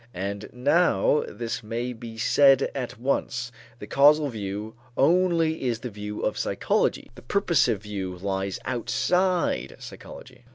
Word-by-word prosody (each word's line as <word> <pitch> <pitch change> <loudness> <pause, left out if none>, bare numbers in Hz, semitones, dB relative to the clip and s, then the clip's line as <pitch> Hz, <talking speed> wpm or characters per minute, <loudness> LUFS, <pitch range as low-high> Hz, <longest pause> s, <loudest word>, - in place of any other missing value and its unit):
And 100 +3 -4
now 145 - +2
this 115 -1 -4
may 120 +3 -4
be 115 -1 -9
said 135 +3 +4
at 125 -5 -5
once: 120 -2 -1 0.3
the - - -8
causal 145 +1 +4
view 105 -1 -5 0.2
only 165 0 +2
is 115 -2 -1
the 125 -1 -5
view 105 0 -6
of 105 - -1
psychology; - - 0
the - - -13
purposive 155 - +1
view 95 -3 -5
lies 95 0 -2
outside 180 +9 0
of - - -15
psychology. - - -11
120 Hz, 135 wpm, -25 LUFS, 105-150 Hz, 0.3 s, said